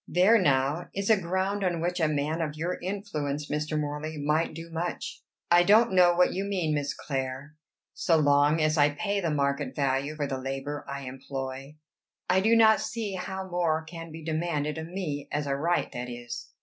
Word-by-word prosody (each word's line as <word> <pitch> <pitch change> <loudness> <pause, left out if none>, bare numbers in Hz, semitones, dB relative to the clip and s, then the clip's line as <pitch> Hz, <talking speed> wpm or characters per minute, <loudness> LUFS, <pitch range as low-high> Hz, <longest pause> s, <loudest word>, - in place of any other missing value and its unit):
There, 195 +6 +5
now, 145 +1 +1
is 200 +2 +1
a 210 -3 +4
ground 190 +3 -1
on 175 -3 0
which 175 +2 -1
a 160 - +3
man 155 +2 -1
of 150 -2 -2
your 170 +4 -3
influence, 155 -7 -3
Mr. 150 +1 -1
Morley, 150 +1 -4
might 150 +2 0
do 165 +1 -8
much." 170 +2 -4 0.3
"I 175 0 +7
don't 215 +4 +5
know 175 -1 +6
what 180 +1 +4
you 190 - -2
mean, 185 -6 -1
Miss 145 -1 -1
Clare. 135 +1 -4 0.4
So 165 - +2
long 145 +1 +4
as 155 0 +2
I 145 0 +6
pay 200 +3 -1
the 170 -4 -1
market 140 -2 -1
value 140 +1 0
for 150 -2 -1
the 135 -1 -3
labor 135 +2 -4
I 140 0 -4
employ, 135 +1 -6 0.5
I 190 - +4
do 220 +4 +4
not 220 -1 +6
see 220 -3 -3
how 190 +1 -5
more 170 -3 0
can 165 0 -9
be 160 +1 -9
demanded 155 -1 -1
of 160 - -6
me 165 -6 -4
as 145 0 -1
a 140 -1 0
right, 170 +5 0
that 125 0 -5
is." 120 0 -7
155 Hz, 195 wpm, -28 LUFS, 145-180 Hz, 0.5 s, I